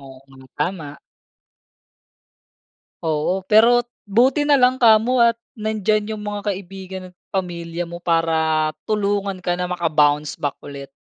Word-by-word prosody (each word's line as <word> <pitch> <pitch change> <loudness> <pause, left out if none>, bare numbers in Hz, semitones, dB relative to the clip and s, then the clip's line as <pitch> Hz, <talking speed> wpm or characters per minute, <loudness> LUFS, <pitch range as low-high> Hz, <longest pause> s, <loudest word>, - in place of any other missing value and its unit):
Oo 135 -1 -14
nga, 130 -1 -17
tama. 150 -2 -4 2.0
Oo, 165 +4 -1
pero 235 +4 +4 0.2
buti 255 +8 +2
na 290 - +5
lang 255 0 +3
kamo 230 +2 +4
at 235 -1 +5 0.2
nandiyan 215 0 -1
yung 210 - -8
mga 205 0 -3
kaibigan 190 0 -8
at - - -37 0.2
pamilya 175 -2 -3
mo 170 0 -8
para 160 -2 +1 0.2
tulungan 200 -3 -1
ka 175 0 -1
na 180 - -1
maka-bounce 150 -4 +1
back 145 -1 -2
ulit 140 -1 -8
185 Hz, 130 wpm, -21 LUFS, 160-215 Hz, 2.0 s, na